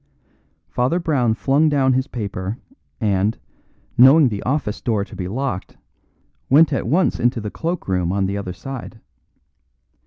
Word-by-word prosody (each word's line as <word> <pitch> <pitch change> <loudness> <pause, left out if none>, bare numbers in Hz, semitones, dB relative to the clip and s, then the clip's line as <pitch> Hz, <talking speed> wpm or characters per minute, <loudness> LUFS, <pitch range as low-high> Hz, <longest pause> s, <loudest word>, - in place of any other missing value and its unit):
Father 125 - 0
Brown 130 -9 +1
flung 140 +6 +2
down 135 -3 +2
his 130 +2 0
paper, 100 -3 -5 0.4
and, 105 -1 +1 0.6
knowing 135 +2 +7
the 105 -3 -4
office 130 -5 -2
door 105 -4 0
to 110 - -13
be 90 -2 -4
locked, 120 -2 -4 0.7
went 150 +3 +5
at 135 - -2
once 175 +9 +1
into 120 0 +1
the 105 -1 -5
cloak 170 +1 -4
room 90 -2 0
on 100 0 0
the 100 +1 -2
other 100 -2 -4
side. 120 +4 -8
120 Hz, 150 wpm, -20 LUFS, 100-140 Hz, 0.7 s, knowing